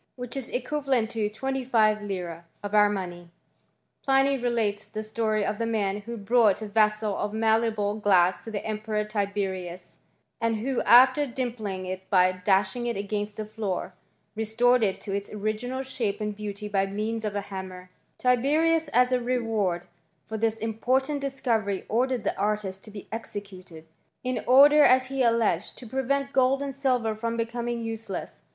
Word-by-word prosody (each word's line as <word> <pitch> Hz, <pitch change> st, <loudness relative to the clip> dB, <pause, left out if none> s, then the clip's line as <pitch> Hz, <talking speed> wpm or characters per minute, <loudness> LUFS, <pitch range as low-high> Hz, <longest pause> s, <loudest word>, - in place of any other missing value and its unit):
which 245 Hz, 0 st, -7 dB
is 270 Hz, -3 st, -4 dB
equivalent 260 Hz, -3 st, -1 dB
to 220 Hz, -2 st, -1 dB
25Z. 215 Hz, -8 st, -1 dB, 0.2 s
of 205 Hz, 0 st, -5 dB
our 210 Hz, -1 st, +6 dB
money. 175 Hz, -4 st, -5 dB, 0.7 s
Pliny 270 Hz, 0 st, +3 dB
relates 230 Hz, -5 st, -1 dB
the 215 Hz, 0 st, -5 dB
story 215 Hz, -1 st, -1 dB
of 205 Hz, +1 st, -2 dB
the 230 Hz, -, 0 dB
man 205 Hz, -3 st, 0 dB
who 235 Hz, +2 st, -7 dB
brought 215 Hz, -1 st, +3 dB
ft 215 Hz, -1 st, -8 dB
vessel 210 Hz, -1 st, +2 dB
of 210 Hz, +1 st, -3 dB
malleable 220 Hz, -2 st, +1 dB
glass 185 Hz, -3 st, +3 dB
to -, -, -7 dB
the 210 Hz, -2 st, -4 dB
Emperor 215 Hz, 0 st, -2 dB
Tiberius, 195 Hz, -4 st, -4 dB, 0.4 s
and 230 Hz, -1 st, +1 dB
who, 245 Hz, +4 st, -1 dB
after 265 Hz, +4 st, +7 dB
dimpling 230 Hz, -7 st, -4 dB
it 185 Hz, +1 st, -6 dB
by 185 Hz, -1 st, +5 dB
dashing 190 Hz, +5 st, +1 dB
it 235 Hz, -, -2 dB
against 205 Hz, +1 st, -3 dB
the 215 Hz, -, -4 dB
floor, 210 Hz, -4 st, -4 dB, 0.4 s
restored 235 Hz, +3 st, +2 dB
it 195 Hz, -3 st, +1 dB
to 195 Hz, -, -5 dB
its 200 Hz, 0 st, -4 dB
original 215 Hz, +5 st, -3 dB
shape 230 Hz, -6 st, -2 dB
and 210 Hz, -1 st, -3 dB
beauty 210 Hz, 0 st, -6 dB
by 195 Hz, -1 st, +1 dB
means 215 Hz, +3 st, -3 dB
of 210 Hz, -1 st, -3 dB
a 205 Hz, -, 0 dB
hammer; 185 Hz, -2 st, -8 dB, 0.3 s
Tiberius, 305 Hz, +6 st, +2 dB
as 250 Hz, +1 st, +4 dB
a 250 Hz, -1 st, +2 dB
reward 225 Hz, -8 st, -1 dB, 0.4 s
for 220 Hz, -, -6 dB
this 225 Hz, 0 st, 0 dB
important 255 Hz, +6 st, 0 dB
discovery, 230 Hz, -8 st, -1 dB
ordered 250 Hz, +1 st, 0 dB
the -, -, -1 dB
artist 205 Hz, -2 st, -1 dB
to -, -, -10 dB
be 205 Hz, -1 st, -10 dB
executed, 195 Hz, -7 st, -8 dB, 0.4 s
in 255 Hz, -1 st, -2 dB
order, 285 Hz, +4 st, +7 dB
as 260 Hz, -2 st, +5 dB
he 270 Hz, -1 st, -2 dB
alleged, 230 Hz, -7 st, +1 dB
to 250 Hz, -, -10 dB
prevent 275 Hz, +3 st, -1 dB
gold 265 Hz, +1 st, +3 dB
and 275 Hz, -1 st, -4 dB
silver 250 Hz, -5 st, 0 dB
from 230 Hz, +2 st, -3 dB
becom 235 Hz, +1 st, -3 dB
* -, -, 0 dB
ing 235 Hz, -1 st, -3 dB
useless. 225 Hz, -3 st, -6 dB
220 Hz, 165 wpm, -26 LUFS, 205-245 Hz, 0.7 s, after